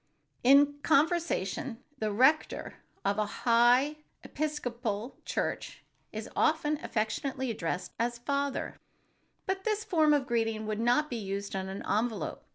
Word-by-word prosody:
In 285 +3 +6
conversation, 290 - +1 0.2
the 215 -1 0
rector 265 +9 +2 0.3
of 200 +2 +1
a 215 - +2 0.2
"high" 245 +5 +5 0.3
Episcopal 245 -7 -3
church - - -3 0.3
is - - -5
often 305 -1 +2
affectionately 245 +4 -2
addressed 180 -3 -3
as 235 +1 0
"Father 280 +3 -2 0.3
——," - - -43
but 380 0 -2
this 430 0 0
form 320 -8 +3
of 280 -2 0
greeting 225 -2 0
would 215 0 -2
not 245 +6 +3
be 245 - -4
used 200 -1 -4
on 190 0 -3
an 195 +1 -6
envelope. 220 +1 -1
245 Hz, 135 wpm, -30 LUFS, 215-295 Hz, 0.3 s, In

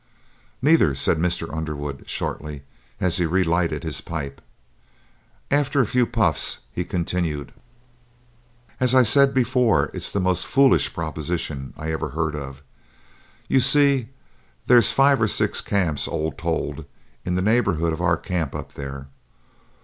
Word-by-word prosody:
"Neither," 145 - +4
said 70 +4 +1
Mr. 85 -1 -1
Underwood, 75 -3 -5
shortly, 75 -2 -4 0.4
as 90 -2 0
he 85 -2 +1
re 95 +3 +1
lighted 85 0 0
his - - -3
pipe. 70 -5 -6 1.1
After 145 0 +1
a 130 - +4
few 125 +2 +1
puffs 110 - +1
he 90 - -3
continued: 85 -4 -3 1.3
"As 125 0 +3
I 130 - +7
said 140 +4 +5
before, 125 - +2
it's - - -2
the 100 - -1
most 90 -1 0
foolish 135 0 +3
proposition 80 -5 -4
I 80 +1 -4
ever 80 -1 -3
heard 80 +2 -2
of. 70 -1 -8 0.8
You 135 - +3
see, 140 -4 +4 0.6
there's 120 -3 +5
five 135 -2 +3
or 110 - +3
six - - 0
camps, 90 -7 -1
all 80 +1 -2
told, - - -4 0.4
in 90 - -2
the 90 - 0
neighborhood 95 -7 +1
of 80 - -5
our 85 -1 +2
camp 85 -6 -3
up - - -7
there. 70 -1 -7
85 Hz, 140 wpm, -22 LUFS, 75-120 Hz, 1.3 s, I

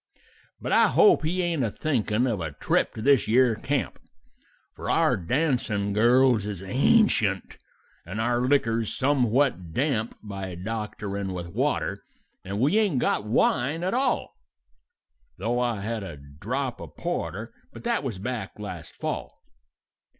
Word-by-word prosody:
"But - - -4
I - - +6
hope 420 -3 +5
he 180 +4 0
ain't 170 -6 0
a 115 - +1
thinkin' 120 -3 0
of 110 -7 -1
a 80 -3 -4
trip - - 0
to 110 - -5
this 140 -4 +4
yere 120 +1 +4
camp, 140 +6 -2 0.8
For - - -6
our - - +3
dancin' 105 - 0
girls 120 0 +4
is 100 -3 -5
ancient, 110 - +2 0.4
and 95 +6 -6
our 120 +2 +1
liquor's 115 -4 +1
somewhat 130 - +1
damp 125 -5 0
By 95 -3 -6
doctorin' 100 -1 -4
with 85 -1 -5
water, - - -1 0.4
and 100 +2 -4
we 150 - +3
ain't 200 -10 +1
got 110 - +1
wine 130 +7 +1
at 185 - 0
all, 260 +1 0 1.0
Though 120 +1 -1
I 120 -4 0
had 110 +2 -3
a 90 -6 -7
drop 70 +1 -4
of - - -11
porter 110 +4 -4 0.2
but - - -11
that 235 -6 0
was 120 -8 -3
back 110 0 -5
last 100 -6 -8
fall. - - -5
115 Hz, 145 wpm, -26 LUFS, 100-135 Hz, 1.0 s, I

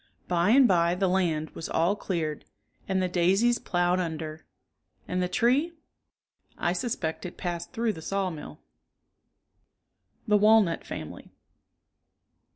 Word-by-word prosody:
By 175 +1 +2
and 260 +2 +6
by 170 -2 +3
the 190 +1 +1
land 170 -4 0
was 160 - -7
all 170 +5 +2
cleared 165 -7 -3 0.4
and 190 -1 0
the - - +1
daisies 190 +7 +2
ploughed 175 0 +1
under. 160 -2 -5 0.6
And 180 0 -1
the 180 - +1
tree.^^ 260 - +2 0.8
I 175 - 0
suspect 175 -5 -3
it 180 - -7
passed 175 -1 -4
through 230 -1 -1
the 160 - -9
sawmill. 180 - -4 1.7
THE 210 -1 +5
WALNUT 210 -4 +4
FAMILY. - - -8
180 Hz, 125 wpm, -27 LUFS, 170-205 Hz, 1.7 s, and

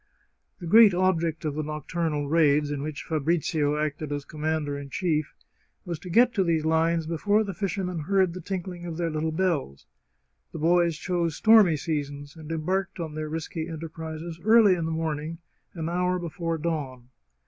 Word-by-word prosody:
The 175 - -7
great 215 +2 +7
object 170 -3 +1
of 150 - -1
the 155 - -2
nocturnal 150 0 -2
raids, 150 -1 +3
in 145 -1 -3
which 150 0 -5
Fabri 160 +2 0
zio 150 -1 0
acted 150 0 -3
as 145 -1 -3
commander 155 -1 -2
in 140 -1 -7
chief, 155 0 -1 0.5
was 170 -4 -4
to 180 - -9
get 240 +7 +4
to 195 - +2
these 165 -3 +1
lines 165 +1 +2
before 205 +7 +1
the 200 -2 -5
fishermen 185 -2 -3
heard 185 +2 +2
the 185 - -7
tinkling 180 -1 -5
of 165 -2 -5
their 170 -1 -1
little 155 +1 -1
bells. 155 - -1 0.7
The - - -5
boys 170 0 +2
chose 170 -2 -1
stormy 215 -7 +6
seasons, 145 -1 -4
and 160 -1 -9
embarked 180 +4 -2
on 160 -3 -4
their 155 0 -4
risky 160 +1 -4
enterprises 160 0 -7
early 220 -2 +6
in 170 -2 -1
the 165 - -2
morning, 160 0 -3 0.4
an 165 -2 -3
hour 180 +1 0
before 165 -1 -3
dawn. 140 -6 -4
165 Hz, 175 wpm, -26 LUFS, 155-175 Hz, 0.7 s, great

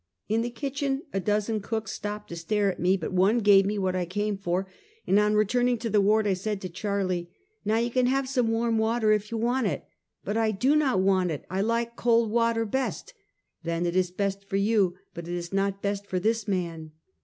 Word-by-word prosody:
In 220 +2 +1
the 240 - -2
kitchen 275 +3 -3
a 195 - 0
dozen 210 +2 0
cooks 220 +2 -3
stopped 210 0 -5
to 170 - -6
stare 200 +4 0
at - - -10
me, 185 +2 +3
but 175 0 -5
one 190 +5 +3
gave 200 -3 +5
me 210 +1 -1
what 190 -2 0
I 180 -1 -1
came 205 +3 -1
for, 190 -1 -1 0.4
and 200 - +4
on 210 0 +2
returning 245 +4 +2
to 230 -1 -4
the 210 0 +4
ward 215 +2 +3
I 200 - +2
said 200 +2 -3
to 185 - -5
Charlie: 185 -2 -2 0.2
" 430 +1 -44
ISTow 220 +2 +2
you 240 - -4
can 255 0 +2
have 270 +1 +1
some 250 -4 +1
warm 225 0 +1
water, 220 0 +2
if 210 0 +1
you 230 - -3
want 240 +1 +1
it." - - -3 0.2
" - - -56
But 205 +2 -1
I 225 -1 +2
do 250 +8 +2
not 265 -11 +2
want 190 -2 +2
it! 155 -4 -4
I 190 +1 0
like 230 +2 -1
cold 230 -2 +2
water 230 0 +2
best!" 265 - -3 0.3
" - - -50
Then 170 +1 -1
it 170 0 -1
is 185 -1 +2
best 200 +1 -2
for - - -2
you, 200 -3 +2 0.2
but 170 0 -7
it 175 - -3
is 175 +1 -5
not 195 0 -1
best 200 0 -2
for 185 - -1
this 220 +3 0
man! 165 -5 -3
210 Hz, 235 wpm, -27 LUFS, 190-230 Hz, 0.4 s, gave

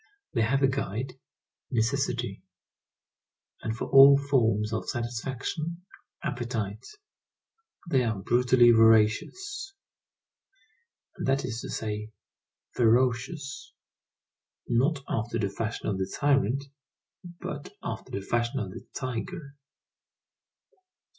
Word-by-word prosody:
They 115 - +1
have 135 +5 +2
a - - +7
guide, 130 -2 -3 0.6
necessity; 120 -3 -1 1.2
and 110 +1 -3
for - - -3
all 140 0 +8
forms 115 -6 +1
of 110 - -3
satisfaction, 135 +8 -4 0.4
appetite. 115 -4 -3 1.0
They 135 -6 +3
are 110 -3 -1
brutally 120 +3 +4
voracious, 115 - +3 1.4
that 135 +1 +1
is 120 -2 -4
to - - -7
say, 105 -1 -4 0.6
ferocious, 125 +5 +1 0.9
not 135 +5 +2
after 115 +1 -2
the 100 -3 0
fashion 110 +3 -4
of 95 -2 -1
the 95 0 -2
tyrant, 140 -2 +2 0.8
but 145 -1 -6
after - - -5
the 100 - -4
fashion 120 +6 -1
of 100 -5 -4
the - - -9
tiger. 140 +4 -5
120 Hz, 100 wpm, -28 LUFS, 110-140 Hz, 1.4 s, all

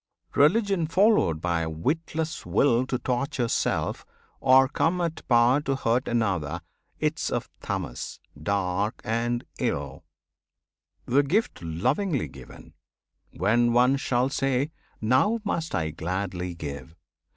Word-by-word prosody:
Religion 185 +3 +3
followed 185 - +3
by 85 -1 0
a 80 - -2
witless 155 - -2
will 120 +7 +2
To 125 - -1
torture 125 0 -1
self, - - -1 0.4
or 130 +1 +6
come 165 +5 0
at 170 -2 -2
power 120 +3 +4
to 135 -2 -1
hurt 125 -1 0
Another, 90 -9 0 0.4
'tis - - 0
of - - -3
Tamas, - - -4 0.2
dark 100 +3 -1
and 120 +2 -1
ill. - - -2 1.0
The 135 +4 +4
gift 185 - 0
lovingly 125 - 0
given, 65 - -13 0.6
when 115 +6 +2
one 125 +3 +5
shall 130 -1 +1
say 135 +1 0 0.3
"Now 130 - +3
must 170 -6 -2
I 80 -1 -1
gladly 90 +2 -3
give!" 70 -2 -7
120 Hz, 120 wpm, -26 LUFS, 90-145 Hz, 1.0 s, or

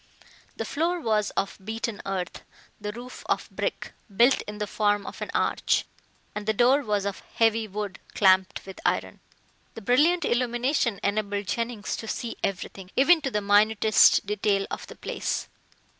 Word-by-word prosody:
The - - -3
floor 340 +4 0
was 215 -7 +1
of 200 - -1
beaten 220 0 -4
earth, 190 -2 -3 0.4
the 210 0 -4
roof 245 +3 -9
of - - 0
brick, - - -3 0.2
built 245 +3 +5
in 210 0 -6
the 210 - -2
form 205 -1 +1
of - - -8
an - - -4
arch, - - +1 0.5
and 210 0 -6
the 220 - +2
door 255 +6 +4
was 210 -5 -1
of 200 -1 -3
heavy 225 -1 +3
wood 205 -1 -5 0.2
clamped 190 -1 +3
with 190 -1 -10
iron. - - -1 0.6
The 225 - -7
brilliant 300 - +3
illumination 240 -1 +1
enabled 205 0 -1
Jennings 230 +1 -2
to 225 - -7
see 230 +1 -4
everything, 190 -1 -4
even 320 +5 +5
to 275 - -1
the 210 -4 -1
minutest 210 +1 +5
detail 200 -1 +1
of - - -5
the - - -10
place. - - -3
215 Hz, 160 wpm, -26 LUFS, 200-240 Hz, 0.6 s, built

